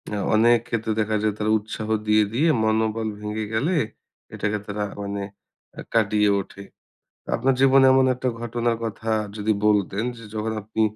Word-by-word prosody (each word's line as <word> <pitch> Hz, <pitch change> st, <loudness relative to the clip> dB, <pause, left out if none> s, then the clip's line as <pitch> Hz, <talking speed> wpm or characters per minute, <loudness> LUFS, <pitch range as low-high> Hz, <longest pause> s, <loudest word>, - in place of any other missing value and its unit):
আ -, -, -2 dB, 0.2 s
অনেক 120 Hz, +2 st, +5 dB
ক্ষেত্রে 115 Hz, -2 st, -2 dB
দেখা 110 Hz, 0 st, -1 dB
যায় 105 Hz, -1 st, +1 dB
তারা 110 Hz, 0 st, 0 dB
উৎসাহ 110 Hz, +1 st, -6 dB, 0.2 s
দিয়ে, 105 Hz, 0 st, +5 dB
দিয়ে 150 Hz, +8 st, +2 dB
মনোবল 110 Hz, 0 st, 0 dB
ভেঙে 105 Hz, +1 st, -4 dB
গেলে, 150 Hz, +12 st, +1 dB, 0.6 s
এটাকে 105 Hz, 0 st, -1 dB
তারা 105 Hz, 0 st, -3 dB, 0.2 s
মানে 100 Hz, 0 st, -4 dB, 0.6 s
আ -, -, -4 dB
কাটিয়ে 105 Hz, -2 st, +3 dB
ওঠে। 100 Hz, +1 st, -12 dB, 0.7 s
আপনার 135 Hz, +1 st, +2 dB
জীবনে 135 Hz, 0 st, +6 dB
এমন 130 Hz, 0 st, +5 dB
একটা 130 Hz, +1 st, -1 dB
ঘটনার 120 Hz, 0 st, -1 dB
কথা 110 Hz, 0 st, -5 dB, 0.3 s
যদি 110 Hz, +1 st, +1 dB
বলতেন 105 Hz, 0 st, +1 dB
যে, 115 Hz, -, -11 dB
যখন 110 Hz, +1 st, -2 dB
আপনি 110 Hz, +2 st, -3 dB
110 Hz, 160 wpm, -23 LUFS, 105-115 Hz, 0.7 s, জীবনে